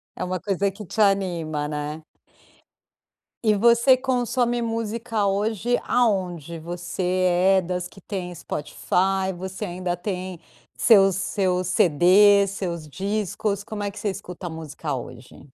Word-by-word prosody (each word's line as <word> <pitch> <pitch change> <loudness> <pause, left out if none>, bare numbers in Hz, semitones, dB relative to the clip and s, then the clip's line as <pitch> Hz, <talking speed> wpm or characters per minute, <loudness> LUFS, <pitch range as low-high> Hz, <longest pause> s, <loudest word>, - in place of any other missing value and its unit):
É - - -4
uma 180 0 -2
coisa 195 0 0
que 210 +1 -10
te 220 - -7
anima, 170 -7 +1
né. 150 +1 -4 1.4
E 215 -1 +4
você 235 +5 +5
consome 245 -2 0
música 225 -1 -2
hoje 215 +4 0
aonde? 180 - 0
Você 175 +2 -5 0.5
é - - +3
das 180 0 -3
que 195 - -17
tem 180 -3 -5
Spotify, 190 +5 -1
você 190 +3 -6
ainda 180 -2 -3
tem 185 -1 -5 0.4
seus 195 -5 +5
seus 185 -2 0
CDs, 195 +2 +5
seus 170 -5 -4
discos, 200 +3 -2
como 205 -1 -5
é 200 - -2
que 205 - -10
você 210 -1 -1
escuta 180 -1 -7
música 160 -2 -5
hoje? 125 0 -10
190 Hz, 130 wpm, -24 LUFS, 175-210 Hz, 1.4 s, você